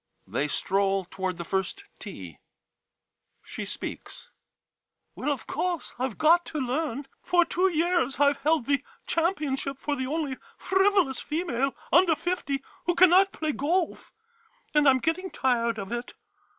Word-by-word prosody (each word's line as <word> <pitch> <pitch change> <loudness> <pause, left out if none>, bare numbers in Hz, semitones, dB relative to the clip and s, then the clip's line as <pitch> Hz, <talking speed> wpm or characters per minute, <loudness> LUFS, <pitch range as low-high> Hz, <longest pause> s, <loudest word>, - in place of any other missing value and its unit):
» - - -44
They 140 - +1
stroll 195 +4 0
toward 190 -2 -3
the 170 - -5
first 190 - -2 0.2
tee - - -9 1.0
She - - -6
speaks - - -7 0.8
Well, - - -3
of 270 -5 -4
course 355 -3 -2
I 260 - +1
Ve 235 - -9
got 335 +3 +5
to 310 - -5
learn. 270 0 -2 0.2
For 350 -1 +3
two 365 +3 +2
years 330 -6 +1
I 285 0 +5
Ve 280 - -18
held 305 -2 +2
the 280 0 +1 0.2
championship 300 -6 -1
for 290 +1 -2
the 260 -1 -3
only 290 -2 -2 0.2
frivolous 380 -7 +2
female 275 -5 -1 0.2
under 345 0 +5
fifty 285 -6 -2 0.2
who 350 - +2
cannot 370 +2 +6
play 310 -1 -2
golf 330 +5 -1 0.3
— - - -37
and 300 -1 +4
I - - +10
'm 260 - +5
getting 330 +8 -1
tired 235 -5 0
of 195 -1 -6
it. 240 +1 -5
290 Hz, 160 wpm, -27 LUFS, 255-350 Hz, 1.0 s, I